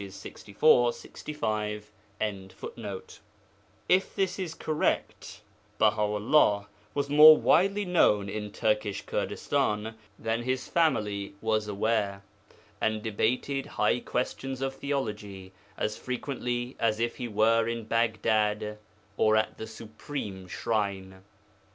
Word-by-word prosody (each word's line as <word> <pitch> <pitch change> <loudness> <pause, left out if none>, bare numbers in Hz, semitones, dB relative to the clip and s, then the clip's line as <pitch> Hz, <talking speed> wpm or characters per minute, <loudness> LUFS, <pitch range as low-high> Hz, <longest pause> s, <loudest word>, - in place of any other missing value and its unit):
64, 120 +5 +2
65.] 110 -9 -4 2.0
If 185 +1 +2
this 195 0 0
is 170 -4 -4
correct, 155 -1 -2 0.4
Baha 105 - +3
'ullah 105 0 +3 0.3
was 140 -1 0
more 150 +2 +9
widely 195 +3 +3
known 105 - +3
in 105 +1 -5
Turkish 105 -1 -1
Kurdistan 105 +1 -1 0.2
than 115 +1 -1
his 130 +1 -2
family 105 -12 0
was 110 -1 0
aware, 100 -1 -1 0.6
and 110 -1 0
debated 125 +5 -1
high 125 - +1
questions 130 +2 -3
of 135 0 -1
theology 105 -9 -4 0.3
as 105 0 -2
frequently 125 -1 -3
as 110 -1 +1
if 120 0 -1
he 125 - -4
were 115 +1 +3
in 115 0 -3
Baghdad 110 -1 0 0.4
or 110 0 +4
at 110 0 0
the 110 - -5
Supreme 110 -3 -7
Shrine. 95 -2 -2
110 Hz, 110 wpm, -28 LUFS, 105-130 Hz, 2.0 s, more